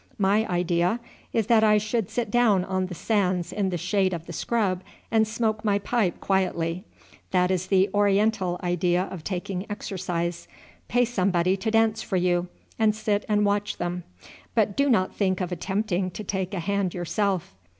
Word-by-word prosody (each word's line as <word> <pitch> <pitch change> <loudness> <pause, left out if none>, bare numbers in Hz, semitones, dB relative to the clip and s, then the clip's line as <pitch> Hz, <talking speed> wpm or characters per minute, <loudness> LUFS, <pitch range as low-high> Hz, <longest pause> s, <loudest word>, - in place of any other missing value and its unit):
My 205 +2 +2
idea 175 +3 +1 0.3
is 225 - +1
that 220 0 +4
I 210 -1 +5
should 215 0 -1
sit 230 -4 -2
down 215 -6 +3
on 185 -1 -1
the 180 - -7
sands 185 -4 0
in 200 -2 0
the 180 - -2
shade 185 +1 +1
of 165 -1 -8
the - - -8
scrub 200 -6 0 0.3
and 220 -1 +3
smoke 220 -1 -1
my 205 -2 +2
pipe 205 -3 0
quietly. 185 -1 0 0.4
That 180 0 +2
is 185 0 -1
the 190 0 +4
oriental 205 -2 +2
idea 175 0 +1
of 180 -4 -7
taking 185 +2 -4
exercise; 175 -4 -3 0.4
pay 245 +2 +3
somebody 185 -5 +1
to 220 +4 -2
dance 225 0 +2
for 190 - -1
you, 175 0 +1 0.3
and 215 -1 +3
sit 215 -1 -1
and 210 0 +3
watch 205 0 0
them, 175 0 -3 0.5
but 210 -3 +2
do 280 0 +2
not 190 -7 +2
think 190 -3 0
of 180 -1 -2
attempting 190 0 -1
to 215 - -7
take 190 0 -3
a - - -2
hand 200 0 -1
yourself. 185 - -1
195 Hz, 175 wpm, -25 LUFS, 180-215 Hz, 0.5 s, I